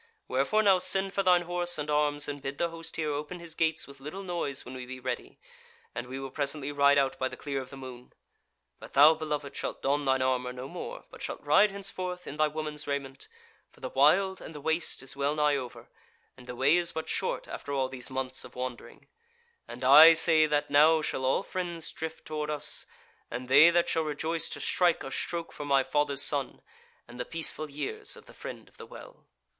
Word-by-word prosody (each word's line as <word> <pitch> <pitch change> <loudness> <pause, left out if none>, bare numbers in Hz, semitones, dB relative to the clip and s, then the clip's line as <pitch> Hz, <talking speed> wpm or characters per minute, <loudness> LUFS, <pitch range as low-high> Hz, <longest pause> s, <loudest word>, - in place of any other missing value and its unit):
Wherefore 140 +12 +1
now 195 -3 +5
send 195 +1 0
for 195 - +1
thine 180 -2 +4
horse 175 0 +1
and 150 -1 -3
arms, 150 -1 +1
and 145 -1 -5
bid 135 +1 -5
the 170 +2 -1
host 165 0 -7
here 155 -2 -1
open 150 +5 -5
his 170 -1 -8
gates 160 -1 0
with 140 0 -14
little 155 +8 -7
noise 170 -7 -3
when 125 - -9
we 130 -1 -7
be 130 0 -7
ready; 125 -1 -5 0.6
and 120 +1 -5
we 130 +2 -6
will 135 -1 -6
presently 145 0 -2
ride 140 0 +4
out 135 -1 +1
by 130 - +1
the - - -9
clear 140 -2 -3
of 130 - -10
the 135 - -10
moon. 125 -2 -10 0.7
But - - -12
thou, 150 +3 +8
beloved, 150 -3 -4
shalt - - -5
don 145 +2 +1
thine 130 -1 +2
armour 125 -1 0
no 125 +1 -7
more, 325 - -7
but - - -13
shalt - - -5
ride 210 - +5
henceforth 185 -2 -5
in 145 - -7
thy 155 0 +3
woman's 150 0 -5
raiment, 140 -1 -4 0.4
for - - -23
the - - -6
wild 185 +8 +3
and 160 - -10
the - - -6
waste 160 0 -1
is 135 - -7
well 140 +2 0
nigh 150 -1 +3
over, 130 -3 -6 0.5
and 125 -1 -15
the 125 - -6
way 135 +7 +4
is 175 -1 -1
but 160 -1 -5
short - - -2
after - - -7
all 135 -2 0
these 130 -2 -7
months 130 0 -2
of - - -13
wandering; 125 -1 -7 0.6
and 125 +2 -9
I 150 +5 +10
say 160 -1 +5
that 150 -1 0
now 155 +2 +5
shall 130 -3 -2
all 135 +8 +2
friends 175 -4 -5
drift 160 0 -7
toward 150 -1 -4
us, 150 -1 -1 0.4
and 125 +1 -5
they 140 +6 +8
that 170 0 +2
shall 165 - +1
rejoice 160 +2 -2
to - - -4
strike 175 -2 +2
a 135 - -7
stroke 170 +3 -3
for - - -7
my 140 -2 +3
father's 145 0 +1
son, 145 -2 0 0.4
and 120 +1 -12
the - - -1
peaceful 155 +1 -2
years 145 -1 -5
of - - -15
the - - -15
Friend - - -9
of - - -23
the - - -11
Well." - - -13
145 Hz, 220 wpm, -29 LUFS, 135-165 Hz, 0.7 s, I